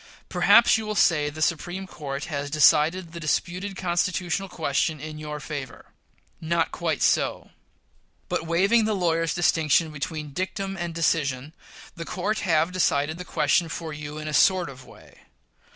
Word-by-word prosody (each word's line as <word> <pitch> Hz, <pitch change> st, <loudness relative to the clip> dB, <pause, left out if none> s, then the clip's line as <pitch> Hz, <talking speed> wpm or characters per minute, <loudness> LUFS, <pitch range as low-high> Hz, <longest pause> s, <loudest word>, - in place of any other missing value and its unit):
Perhaps -, -, +5 dB
you 220 Hz, -, -6 dB
will 215 Hz, -, -3 dB
say 150 Hz, -6 st, +3 dB
the 155 Hz, +1 st, -3 dB
Supreme 175 Hz, +4 st, -2 dB
Court 145 Hz, -5 st, -6 dB
has 145 Hz, -3 st, -4 dB
decided 155 Hz, +4 st, +3 dB
the 170 Hz, -, -8 dB
disputed 180 Hz, +5 st, -2 dB
constitutional 180 Hz, +1 st, -1 dB
question 155 Hz, -2 st, -1 dB
in 155 Hz, +1 st, -7 dB
your 150 Hz, -1 st, -6 dB
favor. 140 Hz, -4 st, -8 dB, 0.5 s
Not 165 Hz, 0 st, 0 dB
quite 165 Hz, -4 st, -2 dB
so. -, -, +1 dB, 0.8 s
But, 165 Hz, -, -2 dB
waiving 195 Hz, +7 st, +3 dB
the 215 Hz, -1 st, 0 dB
lawyer's 165 Hz, -3 st, 0 dB
distinction 160 Hz, -2 st, +2 dB
between 150 Hz, 0 st, -5 dB
dictum 195 Hz, +2 st, -3 dB
and 175 Hz, -3 st, -5 dB
decision, 150 Hz, -4 st, 0 dB, 0.4 s
the 170 Hz, -, -6 dB
court 205 Hz, +6 st, -2 dB
have 165 Hz, -2 st, +1 dB
decided 155 Hz, -3 st, 0 dB
the 180 Hz, -, -6 dB
question 170 Hz, -1 st, +1 dB
for 160 Hz, 0 st, -5 dB
you 150 Hz, 0 st, -7 dB
in 155 Hz, 0 st, -6 dB
a 155 Hz, -, -4 dB
sort 180 Hz, 0 st, +3 dB
of 130 Hz, -1 st, -14 dB
way. -, -, -17 dB
165 Hz, 155 wpm, -25 LUFS, 150-180 Hz, 0.8 s, Perhaps